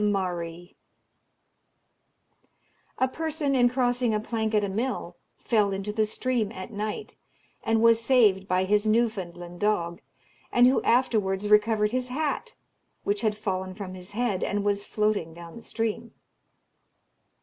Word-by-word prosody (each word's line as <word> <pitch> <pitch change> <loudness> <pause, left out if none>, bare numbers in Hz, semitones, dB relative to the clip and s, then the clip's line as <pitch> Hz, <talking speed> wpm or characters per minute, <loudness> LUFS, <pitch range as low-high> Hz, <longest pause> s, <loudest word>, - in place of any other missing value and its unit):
A 260 - +3
person, 315 0 -2
in 245 -2 +4
crossing 245 -2 +1
a - - +1
plank 220 0 -2
at 210 - +3
a - - 0
mill, 225 +7 -3 0.2
fell 210 -4 +1
into 195 +2 -3
the 215 0 +1
stream 230 -1 -1
at 185 +3 -8
night, 210 +1 -4 0.5
and 225 0 +2
was 230 0 +5
saved 215 -7 +4
by 185 -1 +2
his 205 +2 +2
Newfoundland 185 -6 -1
dog, 175 -5 0 0.5
and 245 0 +5
who 255 +2 +4
afterwards 210 -5 +1
recovered 210 0 +4
his 255 0 -2
hat, 295 +3 -2 0.5
which 205 0 0
had 215 -2 0
fallen 185 -3 -3
from 195 -2 -6
his 185 +2 -11
head, 220 -4 0
and 205 0 -1
was 200 0 0
floating 210 -7 -1
down 170 -1 -10
the 230 - -9
stream. 225 -2 -3
215 Hz, 140 wpm, -27 LUFS, 195-240 Hz, 0.5 s, was